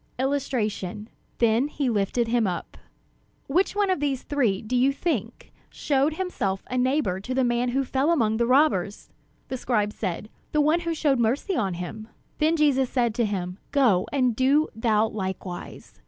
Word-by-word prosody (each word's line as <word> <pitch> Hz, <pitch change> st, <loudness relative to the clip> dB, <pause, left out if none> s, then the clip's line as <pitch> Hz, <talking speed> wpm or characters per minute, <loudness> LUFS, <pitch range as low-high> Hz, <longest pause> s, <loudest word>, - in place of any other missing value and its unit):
'" -, -, -38 dB
[Illustration: 235 Hz, -7 st, -2 dB, 0.3 s
Then 235 Hz, +3 st, +3 dB
he 285 Hz, -2 st, -2 dB
lifted 225 Hz, +1 st, 0 dB
him 230 Hz, -2 st, +2 dB
up] 175 Hz, -2 st, -4 dB, 0.7 s
"Which 360 Hz, +8 st, +1 dB
one 405 Hz, -2 st, +2 dB
of 370 Hz, -, 0 dB
these 275 Hz, -3 st, -1 dB
three, 240 Hz, -10 st, 0 dB
do 230 Hz, +4 st, -3 dB
you 255 Hz, +3 st, +4 dB
think, 315 Hz, +4 st, -3 dB, 0.2 s
showed 285 Hz, +1 st, 0 dB
himself 205 Hz, -, -2 dB
a -, -, -1 dB
neighbor 255 Hz, -7 st, +1 dB
to 250 Hz, +6 st, -5 dB
the 265 Hz, -, +2 dB
man 240 Hz, 0 st, +1 dB
who 270 Hz, +3 st, 0 dB
fell 270 Hz, +4 st, 0 dB
among 225 Hz, -10 st, +2 dB
the 235 Hz, 0 st, +1 dB
robbers?" 250 Hz, -, +2 dB, 0.4 s
The 260 Hz, -, -3 dB
scribe 210 Hz, -4 st, 0 dB
said: 195 Hz, +1 st, -4 dB, 0.2 s
"The 300 Hz, -, +3 dB
one 310 Hz, +3 st, +3 dB
who 335 Hz, -1 st, -2 dB
showed 285 Hz, -4 st, +1 dB
mercy 260 Hz, -, 0 dB
on 195 Hz, -, -1 dB
him." 215 Hz, +5 st, -7 dB, 0.3 s
Then 315 Hz, +2 st, +3 dB
Jesus 270 Hz, -4 st, +3 dB
said 240 Hz, -4 st, +1 dB
to 235 Hz, +1 st, +1 dB
him: 185 Hz, -2 st, -3 dB
"Go 240 Hz, -11 st, +3 dB
and 255 Hz, -4 st, +1 dB
do 275 Hz, +5 st, +3 dB
thou 220 Hz, -1 st, +2 dB
likewise." 190 Hz, -, -6 dB
250 Hz, 175 wpm, -25 LUFS, 210-285 Hz, 0.7 s, you